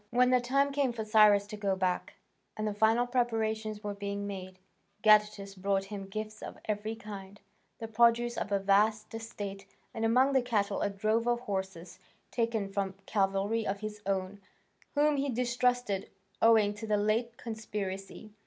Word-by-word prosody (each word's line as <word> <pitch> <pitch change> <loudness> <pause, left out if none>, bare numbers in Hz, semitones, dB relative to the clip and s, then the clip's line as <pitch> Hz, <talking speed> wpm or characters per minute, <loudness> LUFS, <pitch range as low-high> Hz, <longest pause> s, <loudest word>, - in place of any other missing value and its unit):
When 250 +2 +3
the 250 -1 +4
time 275 +3 +2
came 275 -2 +1
for 220 -2 -4
Cyrus 210 -2 +5
to 210 +1 -7
go 200 -2 0
back, 185 -1 -1 0.4
and 215 0 -1
the 210 - -1
final 220 +3 +3
preparations 220 -3 -1
were 205 0 -3
being 200 0 -4
made, 185 -2 -7 0.5
Gadatas 210 -2 +4
brought 195 +1 0
him 195 -1 -6
gifts 215 +2 -6
of - - -8
every 215 +1 -2
kind, 205 -2 -9 0.4
the 225 - -6
produce 235 +1 +3
of 205 - -3
a 200 - +3
vast 210 +3 +2
estate, 205 -3 -6 0.3
and 225 -2 -4
among 255 +5 +4
the 265 - +4
cattle 210 -5 0
a - - +1
drove 215 +4 0
of 240 0 +1
horses, 190 -5 -5 0.3
taken 230 -4 0
from 195 -1 -2
cavalry 200 +2 0
of 195 +1 -2
his 210 -1 -6
own, 195 +1 -2 0.5
whom 295 0 +3
he 275 +1 0
distrusted 245 -4 0 0.3
owing 220 -2 +5
to 215 +2 -7
the 210 -1 +2
late 225 +3 0
conspiracy. 210 -3 -6
215 Hz, 165 wpm, -31 LUFS, 200-230 Hz, 0.5 s, Cyrus